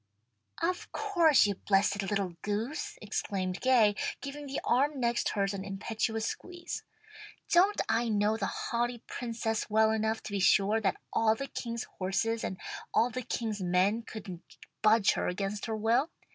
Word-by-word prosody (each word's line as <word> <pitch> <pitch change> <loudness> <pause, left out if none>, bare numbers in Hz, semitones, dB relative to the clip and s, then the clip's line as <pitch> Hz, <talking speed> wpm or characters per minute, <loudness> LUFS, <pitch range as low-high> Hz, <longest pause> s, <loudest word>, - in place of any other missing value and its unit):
"Of 355 +1 -1
course! 345 - +4
you 205 - +1
blessed 200 +1 +1
little 195 -3 -2
goose!" 280 - -3
exclaimed 190 -3 -2
Gay, 240 -5 +5 0.3
giving 285 +1 -7
the 270 - -3
arm 280 +3 +2
next 235 -1 +1
hers 200 -1 0
an 195 -1 -4
impetuous 220 +3 -2
squeeze. 350 +7 -5 0.7
"Don't 380 +4 +5
I 230 0 +1
know 210 0 +2
the 200 -3 -1
haughty 240 0 -2
Princess 225 -2 -3
well 220 +1 +4
enough 220 0 0
to - - -7
be 200 - -1
sure 205 +3 +4
that 205 - +1 0.2
all 220 -1 +3
the 275 - -4
king's 235 -3 -4 0.2
horses 225 +5 0
and 185 - -3 0.3
all 240 +2 +3
the 255 +1 -3
king's 220 -3 -3
men 185 +5 +2
couldn't 195 -6 -9 0.2
budge 215 -1 +5
her - - -1
against 195 +4 -3
her 220 -1 -2
will? 235 +8 +2
220 Hz, 160 wpm, -30 LUFS, 200-245 Hz, 0.7 s, Gay